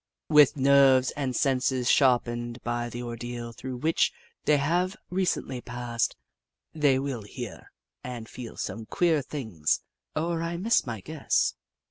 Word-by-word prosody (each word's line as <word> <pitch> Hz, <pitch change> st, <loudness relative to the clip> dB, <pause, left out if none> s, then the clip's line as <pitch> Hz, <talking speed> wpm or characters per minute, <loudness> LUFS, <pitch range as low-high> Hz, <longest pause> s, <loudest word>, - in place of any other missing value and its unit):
With 150 Hz, -2 st, +6 dB
nerves 135 Hz, -1 st, +5 dB
and 135 Hz, -3 st, -3 dB
senses 130 Hz, -2 st, +1 dB
sharpened 120 Hz, -3 st, +2 dB
by 120 Hz, 0 st, -2 dB
the 120 Hz, +1 st, -6 dB
ordeal 120 Hz, 0 st, -5 dB
through 130 Hz, +2 st, -6 dB
which 155 Hz, +6 st, +2 dB, 0.3 s
they 150 Hz, -, +5 dB
have 175 Hz, +7 st, +1 dB, 0.2 s
recently 180 Hz, -8 st, -1 dB
passed, 120 Hz, -1 st, -2 dB, 0.6 s
they 145 Hz, -4 st, +3 dB
will 135 Hz, -3 st, -3 dB
hear 110 Hz, +2 st, -8 dB, 0.3 s
and 120 Hz, -3 st, -6 dB
feel 120 Hz, -1 st, -9 dB
some 110 Hz, +3 st, -5 dB
queer 165 Hz, -4 st, +2 dB
things, 110 Hz, -, -2 dB, 0.3 s
or 165 Hz, +1 st, -1 dB
I 170 Hz, +1 st, -2 dB
miss 210 Hz, -, +2 dB
my 110 Hz, -4 st, -4 dB
guess. 155 Hz, +3 st, 0 dB
130 Hz, 135 wpm, -27 LUFS, 120-150 Hz, 0.6 s, With